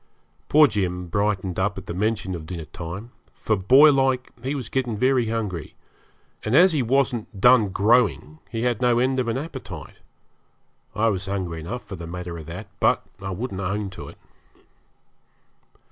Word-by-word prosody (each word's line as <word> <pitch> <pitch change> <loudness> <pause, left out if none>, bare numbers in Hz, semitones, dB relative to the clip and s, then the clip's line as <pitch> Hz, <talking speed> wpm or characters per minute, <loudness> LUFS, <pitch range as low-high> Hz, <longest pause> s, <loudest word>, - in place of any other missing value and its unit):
Poor 155 +1 +7
Jim 90 -7 -1
brightened 100 -2 -1
up 100 +2 0
at 95 - -7
the - - -5
mention 105 0 -1
of 80 -3 -7
dinner 85 -3 -6
time, 95 +9 -8 0.2
for, 110 - -1
boylike, 135 +4 +4
he 135 +4 -2
was 130 -6 -4
getting 125 -4 -2
very 130 0 +2
hungry, 105 -9 -4 0.7
and 110 +4 0
as 180 +4 +7
he 150 -4 +1
wasn't 120 -4 0
done 120 -2 +6
growing 100 - +2
he 115 -1 -3
had 120 -3 0
no 120 -1 +3
end 130 +2 +1
of 125 - -1
an 115 - 0
appetite. 155 +4 -7 1.0
I 115 +3 +3
was 95 -1 -3
hungry 95 -4 -3
enough 120 +10 -6
for 95 - -8
the 85 - -7
matter 90 0 -6
of 80 - -10
that, 95 +6 -7
but - - +3 0.2
I 95 - -4
wouldn't 100 +1 -4
own 100 +1 -2
to - - -9
it. - - -12
105 Hz, 170 wpm, -24 LUFS, 95-125 Hz, 1.0 s, Poor